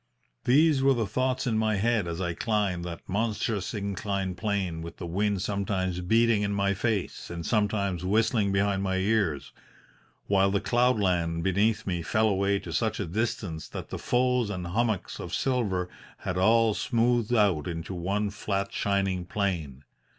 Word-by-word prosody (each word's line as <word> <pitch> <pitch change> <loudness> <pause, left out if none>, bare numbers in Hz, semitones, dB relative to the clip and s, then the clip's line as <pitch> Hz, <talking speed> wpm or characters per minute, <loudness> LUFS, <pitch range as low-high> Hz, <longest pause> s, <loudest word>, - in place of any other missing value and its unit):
"These 145 +2 +4
were 135 0 +4
the 115 -2 0
thoughts 130 +6 -1
in 110 -3 +1
my 110 -1 +1
head 110 -1 +1
as 85 0 -4
I 90 -2 -1
climbed 100 -4 -1
that 85 -1 -7
monstrous 105 -1 -1
inclined 100 -2 -2
plane 95 -3 -2
with 85 0 -8
the 90 - -6
wind 100 +2 0
sometimes 95 -3 -1
beating 115 +3 +3
in 100 0 0
my 100 0 +1
face 100 0 -2
and 85 -1 -5
sometimes 100 -5 0
whistling 110 +1 +2
behind 100 0 +1
my 95 -1 0
ears, 95 -6 0 0.7
while 100 -1 +3
the 100 0 +1
cloud 125 +2 +2
land 85 -4 0
beneath 105 +4 +1
me 90 -3 -1
fell 110 +5 +2
away 100 0 +1
to - - -7
such 110 -2 0
a 105 - -1
distance 90 -4 -3
that - - -7
the - - -5
folds 125 -2 +1
and 90 -4 -4
hummocks 105 +1 -1
of - - -4
silver 105 -9 0 0.3
had 90 - -3
all 110 +4 +4
smoothed 120 +1 +1
out 100 -9 +2
into 85 +2 -4
one 100 +4 -1
flat, 100 -1 -3
shining 95 -2 0
plain. 85 -10 -2
100 Hz, 165 wpm, -27 LUFS, 90-110 Hz, 0.7 s, These